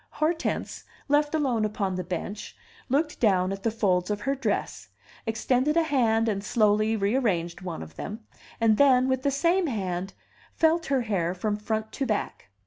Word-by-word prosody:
Hortense, 320 +2 -1 0.2
left 295 +1 +2
alone 260 -8 +1
upon 205 -2 -1
the 185 0 -3
bench, 185 +4 -5 0.3
looked 300 +4 0
down 190 -4 +3
at 195 0 -5
the 225 - +1
folds 185 -5 +1
of 205 0 -2
her 270 +5 0
dress, 205 - -3 0.4
extended 255 +7 +1
a 335 - +5
hand 230 -7 +2
and 200 -2 -1
slowly 215 0 +2
rearranged 200 -6 0
one 175 - -5
of 80 +1 -13
them, 215 +3 -6 0.4
and 225 -2 +4
then, 260 -2 +5
with 260 -1 0
the 280 - +1
same 340 +6 +2
hand, 190 -6 -3 0.4
felt 330 +1 +2
her 275 -2 +2
hair 185 -6 -1
from 205 +3 -1
front 220 +1 -3
to 270 - -3
back. 210 - -3
220 Hz, 170 wpm, -26 LUFS, 195-270 Hz, 0.4 s, a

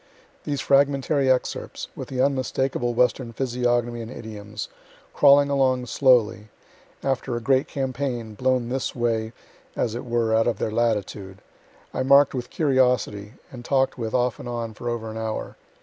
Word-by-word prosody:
These 145 -2 -2
fragmentary 140 0 +2
excerpts, 130 -1 -1
with - - -6
the 130 -1 -2
unmistakable 130 -2 0
Western 125 0 +1
physiognomy 120 -1 0
and 115 - -7
idioms, 105 -3 -7 0.5
crawling 140 0 +5
along 130 -2 +2
slowly 115 -5 +2 0.5
after 135 -2 -1
a - - -1
great 130 +3 +2
campaign, 130 -4 -3
blown 125 +1 0
this 130 +1 -2
way, 115 -2 -1 0.4
as 115 - -1
it 120 - -5
were, 120 -2 0
out 115 +1 +3
of 120 - 0
their 110 - -2
latitude 105 -4 -1 0.6
I - - -1
mark'd 140 +1 +5
with 125 -2 -4
curiosity, 125 -7 +1 0.2
and 125 -2 -9
talk'd 135 +1 +1
with 110 0 -3
off 125 -3 +1
and 120 - -7
on 115 -2 -4
for 120 +3 -5
over 115 -2 -4
an 110 - -7
hour. 110 -1 -4
120 Hz, 155 wpm, -24 LUFS, 115-130 Hz, 0.6 s, crawling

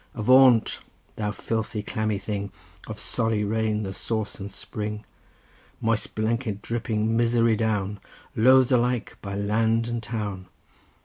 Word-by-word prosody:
Avaunt, 125 +1 +5 0.4
thou 105 -1 -2
filthy, 110 0 -3
clammy 110 0 -1
thing, 100 -1 -4 0.4
Of - - -6
sorry 110 -2 0
rain 110 0 0
the 95 -1 -4
source 110 +2 -3
and 100 +1 -6
spring! 105 +2 -5 0.7
Moist 115 -1 0
blanket 110 -1 -1
dripping 115 -1 -1
misery 115 -1 +3
down, 105 -2 -1 0.4
Loathed 130 +3 +5
alike 125 -1 +1
by 100 -1 -5
land 110 +3 +1
and 120 -1 -3
town! 105 -5 -4
110 Hz, 125 wpm, -25 LUFS, 105-115 Hz, 0.7 s, Avaunt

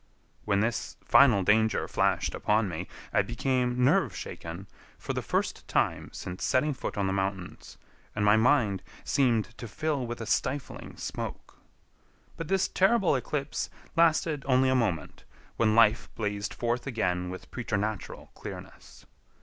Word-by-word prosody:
When 100 -1 +2
this 115 0 -2
final 120 -8 +6
danger 110 +3 +3
flashed - - +1
upon 105 0 +1
me, 85 0 -5 0.3
I - - +4
became 125 -1 0
nerve 130 - +3
shaken 85 +4 -7 0.3
for - - -4
the - - -2
first - - -2
time - - 0
since 90 +1 -6
setting 145 +4 +2
foot 130 - -5
on 100 - +1
the 95 - 0
mountains, 95 -2 -4 0.4
and 105 -1 +1
my 105 +1 +6
mind 110 -5 +3 0.2
seemed 120 -4 +1
to 120 - -6
fill 145 0 -2
with 120 0 -5
a 115 - -4
stifling 135 +4 -2
smoke. - - -6 0.8
But 165 - -6
this 195 +2 +2
terrible 190 -4 +3
eclipse 140 +3 -2 0.3
lasted 160 -3 +3
only 130 0 +4
a 130 - +3
moment, 100 -11 -1 0.3
when 110 -2 +3
life 115 0 +4
blazed 105 -1 -2
forth 120 +2 -1
again 90 -8 -1
with 95 0 -9
preternatural 110 -3 -3
clearness. - - -10
115 Hz, 145 wpm, -28 LUFS, 100-130 Hz, 0.8 s, final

